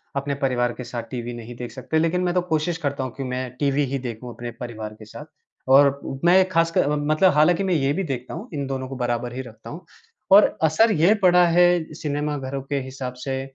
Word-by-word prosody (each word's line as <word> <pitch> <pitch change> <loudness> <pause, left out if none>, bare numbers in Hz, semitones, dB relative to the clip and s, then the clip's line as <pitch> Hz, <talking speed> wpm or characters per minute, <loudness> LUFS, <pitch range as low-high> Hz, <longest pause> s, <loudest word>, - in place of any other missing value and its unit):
अपने 140 0 -2
परिवार 120 -2 +1
के 125 - -8
साथ 120 -1 -5
टीवी 120 -1 -5
नहीं 120 0 -9
देख 120 0 -7
सकते। 155 +4 -2
लेकिन 165 +3 +1
मैं 175 -1 0
तो 180 - +2
कोशिश 165 0 -1
करता 140 -4 -3
हूँ 130 - -4
कि 135 - -3
मैं 125 0 -3
टीवी 145 0 +1
ही 135 +1 -3
देखूँ 120 -1 -7
अपने 120 +1 -7
परिवार 110 -3 -6
के 110 - -11
साथ 145 +7 -10 0.4
और 140 +1 +5 0.3
मैं 180 +2 +6
एक 185 0 +1
खासकर 165 -3 +2
म 145 0 -1
मतलब 180 +4 +4
हालाँकि 165 +5 +3
मैं 185 -2 0
ये 140 -3 +1
भी 195 - -2
देखता 130 -5 -5
हूँ, 225 - -7
इन 140 -2 -3
दोनों 130 -1 -4
को 135 - -7
बराबर 120 -1 -2
ही 130 - -3
रखता 115 -3 -12
हूँ। 165 +3 -9 0.5
और 205 +2 +6
असर 215 +9 +4
ये 175 +4 +4
पड़ा 180 -3 +5
है 175 -2 +3
सिनेमाघरों 145 -3 -3
के 140 +1 -3
हिसाब 130 -1 -6
से, 130 +1 -3
140 Hz, 225 wpm, -23 LUFS, 125-165 Hz, 0.5 s, मैं